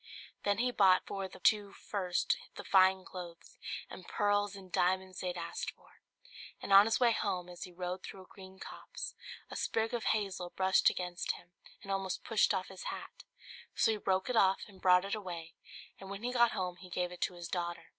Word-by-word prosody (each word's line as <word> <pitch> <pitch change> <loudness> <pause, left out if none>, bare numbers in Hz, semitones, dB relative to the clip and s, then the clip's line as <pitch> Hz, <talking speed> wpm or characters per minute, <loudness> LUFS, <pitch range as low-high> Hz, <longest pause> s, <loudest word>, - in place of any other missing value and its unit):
Then 200 -1 +2
he 250 +2 +1
bought 190 -5 +5
for 195 -1 -4
the 185 - -13
two 205 +1 +3
first 185 -4 0 0.2
the - - -7
fine 190 -1 +5
clothes 175 -3 -9 0.3
and 185 - -10
pearls 205 -1 +1
and 190 -2 -12
diamonds 185 +1 +1
they 185 - -3
had 180 0 -3
asked 170 0 -4
for: - - -17 0.6
and 195 - -1
on 200 +1 +10
his 225 - +2
way 240 -2 +5
home 180 -5 -1
as 175 +1 -7
he 180 - -12
rode 180 +1 -4
through 190 - -9
a - - -18
green 190 0 -13
copse, - - -7 0.4
a - - -6
sprig 225 +1 0
of 235 -2 -2
hazel 195 -4 0
brushed 190 0 +5
against 180 -1 -2
him, 175 - -14 0.3
and 195 - -5
almost 195 -1 -2
pushed 225 -3 +3
off 185 - -1
his 190 -1 -9
hat; - - -7 0.5
so 225 - +4
he 220 - 0
broke 190 -2 0
it 250 - -1
off 195 -3 +4
and 195 -3 -16
brought 180 0 +5
it 200 - -3
away; 175 -6 -5 0.5
and 195 - -9
when 200 +2 -6
he 250 +1 -1
got 235 -2 +4
home 180 -3 -2
he 185 - -12
gave 180 0 -1
it 180 - -10
to 180 - 0
his 175 -1 -6
daughter. 175 -1 -3
190 Hz, 210 wpm, -33 LUFS, 180-200 Hz, 0.6 s, on